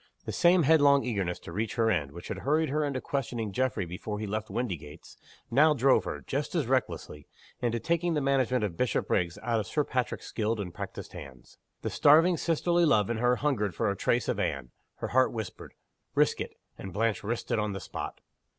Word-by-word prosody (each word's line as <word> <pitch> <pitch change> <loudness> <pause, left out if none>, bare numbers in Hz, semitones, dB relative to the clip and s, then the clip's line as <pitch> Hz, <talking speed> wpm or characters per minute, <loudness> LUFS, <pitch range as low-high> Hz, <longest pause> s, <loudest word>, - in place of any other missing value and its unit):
The - - -3
same 175 0 +4
headlong 145 -2 +5
eagerness 100 -7 -1
to - - -9
reach 110 +1 -2
her 115 -1 +3
end, 75 -8 0
which 85 +2 -9
had - - -4
hurried 155 +3 +1
her 150 +2 0
into 140 -3 -1
questioning 125 -7 -3
Geoffrey 125 -3 0
before 90 +5 -5
he 110 - -3
left 110 +2 -3
Windygates, 80 -10 -5 0.4
now 150 +5 +5
drove 135 +1 +4
her, - - -4
just 140 +5 -3
as 160 -5 +1
recklessly, 120 - -2 0.3
into 120 -1 0
taking 170 +4 0
the - - +2
management 130 -3 +1
of 100 -5 -2
Bishopriggs 90 -7 0
out 115 -1 +1
of 105 - -4
Sir 150 - +1
Patrick's 125 -3 -2
skilled 110 0 -1
and 90 -4 -5
practiced - - -7
hands. 65 -4 -11 0.2
The - - -2
starving 165 +4 +5
sisterly 170 +2 +1
love 115 - +3
in 115 - -1
her 125 +2 +3
hungered 120 - 0
for 110 0 +1
a - - -3
trace 120 +2 +1
of - - -1
Anne. 65 -3 -2 0.2
Her - - -5
heart 130 +1 +3
whispered, 110 -5 -7 0.4
Risk - - +3
it! - - -5 0.2
And 95 - -7
Blanche 110 +3 0
risked 115 +3 -3
it - - +2
on 105 -1 -1
the 95 - -4
spot. - - -6
120 Hz, 205 wpm, -29 LUFS, 100-140 Hz, 0.4 s, headlong